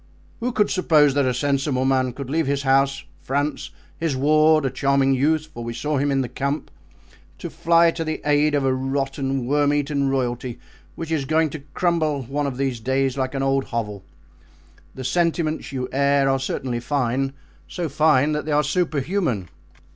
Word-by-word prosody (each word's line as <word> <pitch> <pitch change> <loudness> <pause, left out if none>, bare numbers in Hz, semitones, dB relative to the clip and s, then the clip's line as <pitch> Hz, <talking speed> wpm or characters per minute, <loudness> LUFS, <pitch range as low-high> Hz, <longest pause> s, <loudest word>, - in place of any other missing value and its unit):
Who 245 +1 -1
could 210 -3 +1
suppose 155 -6 +4
that 140 -1 +2
a - - +2
sensible 135 0 0
man 130 -2 +1
could 140 0 -7
leave 155 +2 0
his 140 0 0
house, 135 0 +2 0.2
France, 145 +3 -2 0.3
his 165 -4 -1
ward—a 155 0 +3
charming 135 +1 +2
youth, 155 +4 +1
for 120 - -7
we 115 0 -5
saw 150 +3 -1
him 145 +1 +1
in 135 -1 +1
the 130 - -2
camp—to 140 +4 -7
fly 170 0 +4
to 165 - -4
the 155 0 -3
aid 150 0 +3
of 140 -2 +1
a 130 - +2
rotten, 135 0 -2
worm 145 +2 +2
eaten 145 -1 0
royalty, 125 -2 -2 0.4
which 165 -1 -6
is 150 -4 0
going 155 +1 +1
to 155 - -6 0.2
crumble 160 -6 +1
one 140 +4 -2
of 130 -3 -4
these 135 -3 -1
days 130 +2 0
like 130 0 -2
an 135 - -1
old 135 0 +1
hovel. 105 -4 -4 0.9
The 130 - -6
sentiments 160 +2 0
you 130 -2 -3
air 140 0 +2
are 135 0 +2
certainly 130 -2 -3
fine, 135 +1 -1 0.3
so 175 -2 -3
fine 150 -1 +3
that 150 -1 -2
they 155 - -3
are 150 0 +3
superhuman." 150 - -1
140 Hz, 175 wpm, -22 LUFS, 130-155 Hz, 0.9 s, suppose